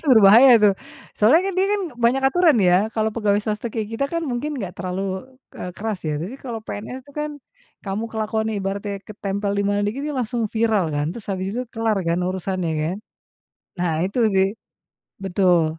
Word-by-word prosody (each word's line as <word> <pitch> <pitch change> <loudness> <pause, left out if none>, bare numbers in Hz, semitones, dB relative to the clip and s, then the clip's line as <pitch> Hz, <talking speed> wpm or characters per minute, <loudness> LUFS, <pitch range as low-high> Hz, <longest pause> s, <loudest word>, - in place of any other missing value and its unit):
PNS - - -21
tuh 300 - +1
berbahaya 220 +6 +8
tuh. 205 - +6 0.4
Soalnya 245 +11 +5
kan 390 - -1
dia 380 - +3
kan 415 - +1 0.2
banyak 240 +3 +2
aturan 330 -2 +4
ya, 180 -1 +5 0.2
kalau 220 0 +1
pegawai 205 -3 +2
swasta 215 +2 -2
kayak 220 -3 -3
kita 275 - 0
kan 335 0 -1
mungkin 275 +4 -3
nggak 185 -6 -5
terlalu, 190 +5 -4 0.2
eee, 180 - -6
keras 215 -2 -3
ya. 150 -1 -1
Tapi 195 +10 -5
kalau 235 -4 -5
PNS 235 +6 -6
itu 285 - -16
kan, 300 0 -2 0.6
kamu 195 +3 -2
kelakuannya 220 0 -1
ibaratnya 200 +1 -3
ketempel 200 -1 -3
di 200 - +2
mana 205 0 +1
dikit 235 +7 -3
dia 300 - -3
langsung 240 -2 -1
viral 220 -7 +1
kan. 145 0 0
Terus 230 - -9
habis 190 0 -2
itu 250 - -1
kelar 225 -3 0
kan 170 +1 +1
urusannya 185 -1 -2
kan. 165 +5 -2 0.8
Nah, 175 -2 0
itu 200 - -4
sih. 190 0 +3 0.7
Betul. 180 -3 +3
210 Hz, 190 wpm, -22 LUFS, 190-240 Hz, 0.8 s, berbahaya